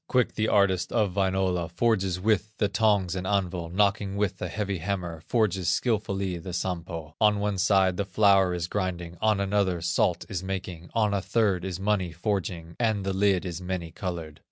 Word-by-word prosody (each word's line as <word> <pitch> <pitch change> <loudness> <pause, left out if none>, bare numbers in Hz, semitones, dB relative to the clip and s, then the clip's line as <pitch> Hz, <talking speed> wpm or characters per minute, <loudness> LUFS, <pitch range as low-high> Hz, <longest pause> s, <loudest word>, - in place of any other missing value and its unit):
Quick 125 -2 +2
the 110 -1 0
artist 95 -4 +2
of 105 -5 +1
Wainola 95 -3 +1
Forges 95 -1 +1
with 105 +1 0
the 105 - +2
tongs 100 -5 +2
and 95 0 -3
anvil, 90 -4 -1
Knocking 100 +1 +1
with 100 -2 -1
a - - -1
heavy 100 -3 -3
hammer, 90 -3 -3
Forges 95 -6 +1
skilfully 100 -3 0
the 90 +1 -7
Sampo; 85 -3 -4
On 105 -1 +5
one 100 -2 -1
side 95 -2 +3
the 100 - +1
flour 95 -3 +4
is 85 -1 -2
grinding, 90 -3 -3
On 110 -2 +3
another 100 -2 +1
salt 85 0 +1
is 100 -5 -3
making, 95 -3 -5
On 105 -2 +2
a 100 - 0
third 100 -4 +1
is 95 -2 -4
money 95 -3 0
forging, 85 -2 -3
And 110 -4 +1
the 95 - 0
lid 95 -1 +2
is 90 -1 -5
many 90 -2 -4
colored. 85 -5 -5
95 Hz, 180 wpm, -27 LUFS, 90-105 Hz, -, On